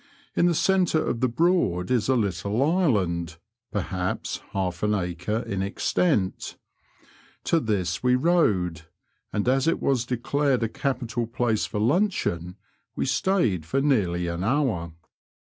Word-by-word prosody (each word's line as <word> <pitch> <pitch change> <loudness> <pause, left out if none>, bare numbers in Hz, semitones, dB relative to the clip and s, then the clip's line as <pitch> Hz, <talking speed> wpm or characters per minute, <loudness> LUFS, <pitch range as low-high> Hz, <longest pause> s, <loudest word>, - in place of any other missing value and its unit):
In 175 - +4
the 170 - +2
centre 180 -3 +2
of 115 - -1
the 130 0 +2
Broad 120 - +1
is 125 -1 +1
a 130 - +4
little 100 +2 0
island, 95 - +1 0.3
perhaps 90 -2 -3
half 90 -3 -2
an 105 0 +2
acre 90 +4 -2
in 95 -1 -2
extent; 100 - 0 0.9
to 165 - +2
this 95 - -1
we 125 0 +3
rowed, 95 - +1 0.4
and 105 - -1
as 135 +3 +2
it 165 - +2
was 125 -3 +1
declared 130 +1 0
a 115 - 0
capital 120 -3 -2
place 115 -2 0
for 105 - -3
luncheon, 110 - 0 0.4
we - - -1
stayed 130 - +1
for 130 - -1
nearly 100 -12 +1
an 85 +1 -3
hour. 110 - 0
115 Hz, 140 wpm, -25 LUFS, 90-135 Hz, 0.9 s, In